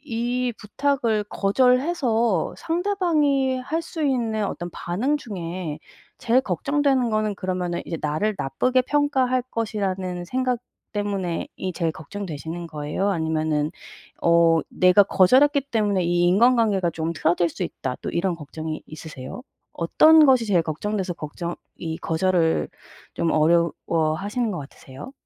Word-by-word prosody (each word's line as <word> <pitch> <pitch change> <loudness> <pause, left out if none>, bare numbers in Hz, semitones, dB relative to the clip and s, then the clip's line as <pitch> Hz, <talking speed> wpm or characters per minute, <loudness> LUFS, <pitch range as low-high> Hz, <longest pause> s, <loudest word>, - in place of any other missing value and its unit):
이 245 +2 0
부탁을 230 -1 0
거절해서 245 - +2
상대방이 325 -7 +1
할 315 +6 -2
수 325 -1 -5
있는 235 -6 0
어떤 175 -3 -5
반응 240 +13 -1
중에 175 - -5 0.4
제일 245 +3 +3
걱정되는 265 - +1
거는 215 -1 0
그러면은 180 -2 -2
이제 165 - -4
나를 155 +9 0
나쁘게 255 - +1
평가할 260 -3 +1
것이라는 190 -5 -2
생각 255 +4 -1 0.3
때문에 200 -4 -2
이 185 - -3
제일 165 -2 -1
걱정되시는 165 0 -6
거예요? 150 +5 -2
아니면은 155 -3 0 0.5
어 170 -1 +4
'내가 185 +2 +5
거절했기 265 +10 +4
때문에 205 -4 +1
이 175 0 +1
인간관계가 210 -2 +3
좀 165 +1 -3
틀어질 170 +2 +1
수 - - -5
있다.' 130 -1 -4
또 - - -4
이런 175 +1 0
걱정이 155 0 -6
있으세요? 155 - -9 0.3
어떤 310 - +6
것이 260 -4 +4
제일 190 -5 +3
걱정돼서 185 +4 -3
걱정 170 +2 -6 0.2
이 160 -1 -4
거절을 165 0 +1 0.4
좀 165 - 0
어려워 160 0 +2
하시는 215 +4 -2
것 180 - -4
같으세요? 135 - -11
195 Hz, 305 characters per minute, -23 LUFS, 165-250 Hz, 0.5 s, 어떤